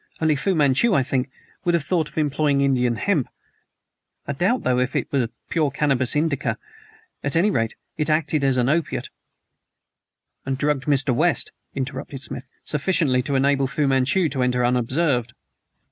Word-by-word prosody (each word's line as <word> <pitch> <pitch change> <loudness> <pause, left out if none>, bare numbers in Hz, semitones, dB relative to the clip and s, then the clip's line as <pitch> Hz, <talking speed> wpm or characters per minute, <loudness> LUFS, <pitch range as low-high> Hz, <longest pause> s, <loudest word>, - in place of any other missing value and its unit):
Only 155 -2 +2
Fu 190 +6 0
Manchu, 150 - +3
I 135 - +3
think, 130 0 -1 0.3
would 175 -2 +2
have 165 - 0
thought 160 +1 0
of - - -21
employing 145 -1 +1
Indian 125 -3 +2
hemp. 150 - 0 1.0
I 140 - -3
doubt, 190 - +1
though, 125 -1 +2
if 125 +1 -1
it - - -1
was 130 -4 +1 0.2
pure 155 -3 +1
Cannabis 135 -3 +1
indica. 150 -2 0 0.7
At 140 - 0
any 190 +6 +3
rate, 115 - -1 0.2
it 150 0 -1
acted 155 -1 +1
as 135 -2 +2
an 125 -1 +2
opiate 155 +3 -1 0.7
" - - -59
"And 135 0 -2
drugged 145 -1 0
Mr. 140 -3 +2
West," 165 +8 +1 0.2
interrupted 135 0 -5
Smith, 125 - -6 0.2
"sufficiently 150 -4 +1
to 140 +2 -2
enable 135 0 +2
Fu 145 +1 0
Manchu 135 +7 +2
to 135 -2 -2
enter 125 -1 +1
unobserved." 125 0 0
140 Hz, 165 wpm, -23 LUFS, 130-155 Hz, 1.0 s, Manchu